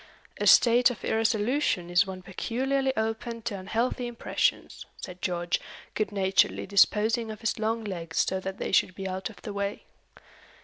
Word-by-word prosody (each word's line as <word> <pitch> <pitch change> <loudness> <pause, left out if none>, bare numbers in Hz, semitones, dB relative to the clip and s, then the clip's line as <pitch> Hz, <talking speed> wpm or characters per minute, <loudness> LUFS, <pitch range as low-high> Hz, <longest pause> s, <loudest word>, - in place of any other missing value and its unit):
"A - - +1
state 245 +1 +6
of 235 -6 -6
irresolution 220 -4 +1
is 175 +2 +4
one 185 -1 -7
peculiarly 265 +8 -1
open 225 +1 -3
to 210 -4 -3
unhealthy 235 +6 -1
impressions," 240 +1 -2
said 180 -1 -9
George, 175 -1 -1 0.3
good 215 -1 -1
naturedly 195 -1 +2
disposing 220 +3 +3
of 215 0 -7
his 225 - -1
long 225 +1 -1
legs 170 -5 -1
so 190 - -1
that 190 0 -5
they - - -3
should 185 -1 +3
be 195 -1 -5
out 190 +2 -4
of 220 - -15
the 210 - -5
way. 200 0 -3
210 Hz, 165 wpm, -27 LUFS, 190-230 Hz, 0.3 s, state